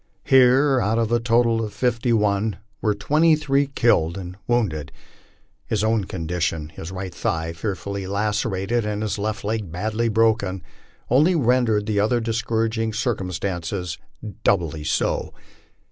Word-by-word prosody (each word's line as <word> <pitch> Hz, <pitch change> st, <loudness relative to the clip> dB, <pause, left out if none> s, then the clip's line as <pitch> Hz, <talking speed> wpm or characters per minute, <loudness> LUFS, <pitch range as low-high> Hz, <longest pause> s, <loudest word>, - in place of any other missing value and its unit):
Here, 130 Hz, +1 st, +5 dB
out 110 Hz, +1 st, +1 dB
of 115 Hz, -1 st, 0 dB
a 120 Hz, -, +3 dB
total 115 Hz, -1 st, +2 dB
of 105 Hz, -, -5 dB
fifty 120 Hz, -1 st, 0 dB
one, 105 Hz, -1 st, +1 dB, 0.2 s
were 105 Hz, -2 st, +1 dB
twenty 155 Hz, +10 st, +3 dB
three 140 Hz, -2 st, +1 dB
killed 100 Hz, -, +2 dB
and 90 Hz, -1 st, -7 dB
wounded. 90 Hz, -, 0 dB, 0.8 s
His 105 Hz, -1 st, 0 dB
own 110 Hz, -2 st, +1 dB
condition, 80 Hz, -3 st, -2 dB
his 80 Hz, +2 st, -8 dB
right 95 Hz, -1 st, -6 dB
thigh 80 Hz, -1 st, -2 dB
fearfully 100 Hz, +1 st, -4 dB
lacerated, 105 Hz, +2 st, -1 dB
and 105 Hz, 0 st, -2 dB
his 110 Hz, -1 st, -2 dB
left 110 Hz, +1 st, -3 dB
leg 105 Hz, -4 st, -2 dB
badly 110 Hz, +6 st, -1 dB
broken, 110 Hz, -5 st, +1 dB, 0.5 s
only 155 Hz, +8 st, +4 dB
rendered 120 Hz, -6 st, +2 dB
the 105 Hz, -2 st, 0 dB
other 110 Hz, +4 st, +2 dB
discouraging 115 Hz, 0 st, -1 dB
circumstances 90 Hz, -5 st, -3 dB, 0.4 s
doubly 85 Hz, -6 st, +1 dB
so. 75 Hz, -, -1 dB
110 Hz, 135 wpm, -23 LUFS, 95-115 Hz, 0.8 s, Here